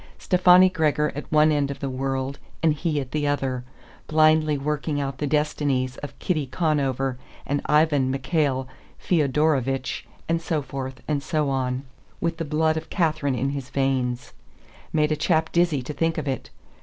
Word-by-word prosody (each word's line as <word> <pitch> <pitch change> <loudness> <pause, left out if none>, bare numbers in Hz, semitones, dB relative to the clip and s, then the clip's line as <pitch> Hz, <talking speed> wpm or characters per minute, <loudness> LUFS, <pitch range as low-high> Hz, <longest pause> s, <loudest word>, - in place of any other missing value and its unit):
Stefani 180 0 +6
Gregor 155 -4 +1
at 145 - -7
one 155 0 +5
end 145 -2 +1
of 140 - -5
the 140 - -3
world 135 +1 -2 0.2
and 160 -2 +4
he 150 0 -1
at 130 -2 -6
the 150 -1 0
other, 135 -3 -1 0.4
blindly 155 -1 +4
working 150 +1 -2
out 135 -2 -3
the 150 - -1
destinies 140 -3 0
of 145 - -8
Kitty 155 -7 -1
Conover 135 -4 0 0.3
and 145 0 -1
Ivan 150 -3 +3
Mikhail 135 -1 0 0.3
Feodorovich 140 -4 0 0.2
and 165 0 0
so 160 -3 -1
forth 130 -1 -6
and 150 -2 0
so 150 -1 0
on, 130 0 -1 0.4
with 165 0 -1
the 165 - -3
blood 155 +1 +1
of 160 - -6
Catharine 155 -6 0
in 135 +3 -1
his 135 -3 -5
veins! 130 -3 -1 0.6
Made 150 -1 +2
a - - +3
chap 160 +1 +1
dizzy 170 -6 +2
to 150 - -5
think 165 +2 0
of 150 -2 -3
it. 135 -1 -3
145 Hz, 170 wpm, -24 LUFS, 135-155 Hz, 0.6 s, Stefani